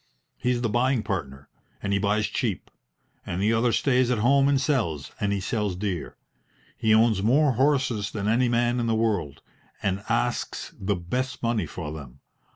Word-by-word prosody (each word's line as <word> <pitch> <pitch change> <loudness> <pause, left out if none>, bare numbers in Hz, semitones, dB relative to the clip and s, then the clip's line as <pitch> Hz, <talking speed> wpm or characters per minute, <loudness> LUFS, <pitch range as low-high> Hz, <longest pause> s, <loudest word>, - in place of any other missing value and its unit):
"He's 125 -1 -1
the - - +2
buying 120 +1 +1
partner, 70 -8 -4 0.4
and 100 0 0
he 100 - +2
buys 105 +1 +1
cheap; - - -3 0.5
and 85 - -4
the 105 +3 +2
other 115 +1 +2
stays 130 0 +2
at 125 - +1
home 135 +5 +4
and 140 -1 +3
sells, 115 - -1
and 100 -1 0
he 100 - 0
sells 105 -1 -2
dear. 95 -2 -4 0.6
He 110 -2 +1
owns 110 -2 +4
more 135 +7 +4
horses 130 -5 +1
than 105 -1 -3
any 120 +3 +3
man 120 +1 +1
in 120 - -1
the 115 - +2
world, 100 -11 -1 0.4
and 100 0 -1
asks - - -1
the 100 +1 0
best 125 +11 -3
money 115 -7 0
for 75 -1 -6
them. 70 -4 -10
110 Hz, 175 wpm, -25 LUFS, 95-125 Hz, 0.6 s, home